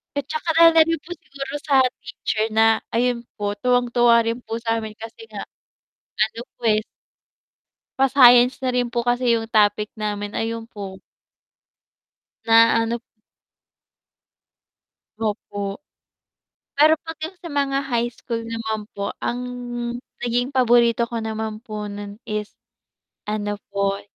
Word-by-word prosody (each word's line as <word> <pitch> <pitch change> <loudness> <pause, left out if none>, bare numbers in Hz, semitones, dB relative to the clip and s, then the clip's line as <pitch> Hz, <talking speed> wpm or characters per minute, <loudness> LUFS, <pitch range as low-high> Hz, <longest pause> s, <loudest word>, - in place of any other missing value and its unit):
At 285 - -1
tsaka 310 +2 -3
alam 325 -1 +7
niyo 330 0 +1
po 345 - -13
siguro 275 -4 -8
sa 275 -2 +5 0.2
teacher 225 -2 -2
na 225 0 +4 0.2
ayun 240 0 +1
po 205 -1 -2
tuwang-tuwa 240 -1 +4
rin 230 +1 -2
po 225 - -4
sa'min 225 -2 -2
kasi 225 - -10
nga - - -7 0.8
ano 230 - -11 0.2
po - - -33
eh 215 0 +3 1.2
pa 270 - +5
science 245 -1 +7
na 260 - 0
rin 250 -1 +1
po 240 - +1
kasi 245 0 +2
yung 225 -1 -1
topic 210 -1 +3
namin 205 -1 -3
ayun 225 0 -3
po. 195 -2 -8 1.4
Na 230 0 +6
ano 235 +1 -2 2.2
Opo. 205 0 -3 1.0
Pero 310 +2 +6
'pag 325 0 -7
yung 355 +4 -7
sa 350 -1 -9
mga 280 -1 +1
high 240 -3 0
school 235 -1 -5
naman 220 -2 -4
po, 200 0 -3
ang 245 - -2 0.8
naging 245 +1 0
paborito 240 -3 +3
ko 235 0 -4
naman 220 -1 -4
po 215 -3 -6
nun 205 0 -7
is 210 0 -4 0.8
ano 205 -1 -2 0.2
po, 200 0 0
230 Hz, 130 wpm, -22 LUFS, 215-250 Hz, 2.2 s, alam